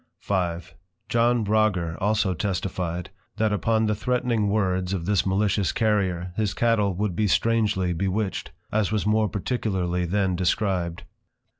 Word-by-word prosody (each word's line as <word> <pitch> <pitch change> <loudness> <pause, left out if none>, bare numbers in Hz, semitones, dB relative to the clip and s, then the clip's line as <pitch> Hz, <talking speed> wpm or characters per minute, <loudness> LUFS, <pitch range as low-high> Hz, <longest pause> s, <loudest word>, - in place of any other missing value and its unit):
V. - - -3 0.8
John 120 0 +2
Rogger 100 -6 +1
also 105 -1 +2
testifyed, 90 -1 -3 0.3
That 110 -1 +1
upon 110 +2 +1
the 105 - +1
threatning 120 -1 0
words 95 -3 0
of 85 -4 -3
this 100 -1 +1
malicious 100 0 +1
Carrier, 95 -5 0
his 105 -1 -1
Cattle 105 -5 +2
would 100 -1 -1
be 105 +2 +1
strangely 105 -4 +1
bewitched; 95 +3 -2 0.2
as 105 -2 +1
was 105 -2 0
more 105 0 +2
particularly 95 -4 -1
then 95 +1 0
described. 90 -2 0
100 Hz, 135 wpm, -25 LUFS, 90-110 Hz, 0.8 s, John